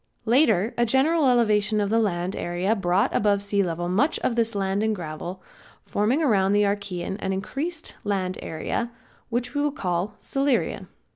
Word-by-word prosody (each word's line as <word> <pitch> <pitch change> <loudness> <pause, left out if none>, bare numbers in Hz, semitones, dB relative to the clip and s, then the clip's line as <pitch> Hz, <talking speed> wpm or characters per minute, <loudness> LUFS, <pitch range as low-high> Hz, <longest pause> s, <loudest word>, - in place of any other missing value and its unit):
Later 225 - +3
a 240 - +4
general 285 +5 +3
elevation 215 -3 +3
of 205 0 0
the 225 - +3
land 185 -3 -1
area 175 +5 0
brought 185 -1 +1
above 200 -1 +2
sea 200 0 +1
level 175 -2 -2
much 225 - +2
of 235 - 0
this 230 -2 +1
land 195 0 0
and 220 0 +1
gravel, 175 +1 -6 0.4
forming 235 +10 +1
around 200 -7 +3
the 205 0 +4
Archaean 200 -2 -2
an 190 - -2
increased 300 - -4
land 185 -2 -1
era, 235 +9 -3 0.4
which 245 +2 -2
we 290 0 +1
call 190 - -2
Silurian. 275 -2 0
205 Hz, 160 wpm, -25 LUFS, 190-240 Hz, 0.4 s, a